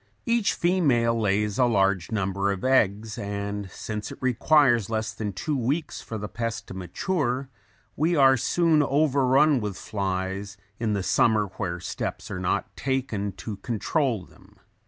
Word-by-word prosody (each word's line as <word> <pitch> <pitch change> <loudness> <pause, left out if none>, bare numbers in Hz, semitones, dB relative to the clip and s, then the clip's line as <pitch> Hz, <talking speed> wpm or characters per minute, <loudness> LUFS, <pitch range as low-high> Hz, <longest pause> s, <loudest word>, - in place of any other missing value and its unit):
Each 235 -3 +2
female 145 -11 +2
lays 105 -1 0
a 125 - +5
large 100 -5 +1
number 100 -1 0
of 95 -2 -4
eggs 110 -4 +2
and 100 -1 -4
since 105 +3 -5
it - - -8
requires 130 - +3
less 110 -1 -2
than 105 -2 -3
two 145 - -3
weeks 140 +5 -2
for 110 - -6
the 105 0 -5
pest 115 0 -4
to - - -6
mature, 130 - -2 0.5
we 165 +4 +1
are 135 -3 +6
soon 160 +4 +2
overrun 140 0 +3
with 105 -3 -4
flies 95 0 -3 0.2
in 110 -2 0
the 100 -2 -1
summer 110 +2 +3
where 90 -4 -3
steps 90 - -5
are - - -3
not 90 - -1
taken 125 -7 -2
to 100 +3 -7
control 115 - -1
them. 95 +3 -21
110 Hz, 155 wpm, -26 LUFS, 100-135 Hz, 0.5 s, are